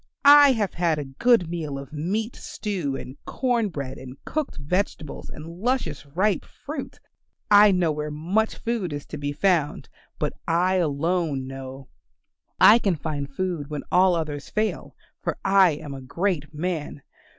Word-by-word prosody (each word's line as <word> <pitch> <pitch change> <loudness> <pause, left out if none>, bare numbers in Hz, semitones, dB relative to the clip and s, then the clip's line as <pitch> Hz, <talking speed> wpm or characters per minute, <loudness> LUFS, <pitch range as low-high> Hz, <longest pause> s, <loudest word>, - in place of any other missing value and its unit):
I 285 -1 +9
have 210 -6 -1
had 170 -3 +1
a 145 - -3
good 180 - +3
meal 160 -4 -4
of 140 +2 -9
meat 205 +10 -2
stew 180 -10 -4
and 130 +1 -8
corn 240 -5 0
bread 140 -5 -6
and 130 +1 -10
cooked 305 - -3
vegetables 155 0 -3
and 155 - -9
luscious 170 - -2
ripe 190 +8 +1
fruit. 290 -1 -8 0.5
I 205 0 +8
know 180 -4 +2
where 150 0 -3
much 180 +9 0
food 225 -9 -2
is 145 0 -5
to - - -7
be 145 0 -2
found, 160 -1 0 0.3
but - - -1
I 180 +3 +2
alone 160 -3 0
know. 135 0 -8 0.7
I 225 +3 +8
can 195 -6 +1
find 145 -2 -4
food 170 -2 -3
when 150 -2 -4
all 180 0 +5
others 150 -3 -4
fail, 215 0 -2 0.3
for - - -2
I 195 -4 +5
am 145 -1 -7
a 135 - -7
great 160 +2 -2
man. 155 -3 -4
165 Hz, 160 wpm, -24 LUFS, 145-200 Hz, 0.7 s, I